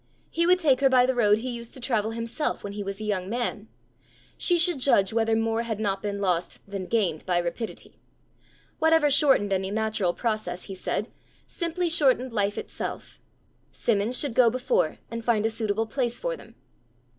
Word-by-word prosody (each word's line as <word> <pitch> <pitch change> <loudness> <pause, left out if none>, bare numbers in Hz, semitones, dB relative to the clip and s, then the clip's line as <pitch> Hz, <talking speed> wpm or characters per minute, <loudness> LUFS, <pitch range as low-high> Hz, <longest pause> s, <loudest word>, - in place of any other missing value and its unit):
He 335 +1 +1
would 365 +1 +6
take 285 -8 +3
her 275 -1 +4
by 255 -1 +5
the 260 - +1
road 210 -4 +4
he 250 +3 -4
used 235 -1 -7
to - - -8
travel 225 -4 0
himself 230 +6 -3
when 200 - -5
he 205 - -5
was 195 0 -5
a - - -5
young 195 -3 -2
man: 225 -2 -3 0.7
she 350 - +2
should 340 -3 +2
judge 210 -7 +3
whether 225 0 +2
more 225 0 0
had 225 -3 -3
not 195 -2 -1
been 200 -1 -3
lost 180 -3 -1
than 195 -2 -5
gained 190 -9 0
by 180 -1 +2
rapidity! 175 +6 -5 0.8
Whatever 320 -2 +4
shortened 265 -8 +4
any 190 0 -1
natural 215 -4 0
process, 215 -6 -2
he 195 - -7
said, 190 - -3 0.3
simply 345 +1 -2
shortened 265 -6 +2
life 205 -1 0
itself. - - -6 0.5
Simmons 225 +2 +1
should 285 -5 0
go 240 -1 +5
before, 370 - 0
and 230 0 -5
find 225 -2 +1
a 225 - +1
suitable 220 0 -1
place 240 0 -2
for - - -2
them! - - -15
225 Hz, 185 wpm, -26 LUFS, 205-260 Hz, 0.8 s, would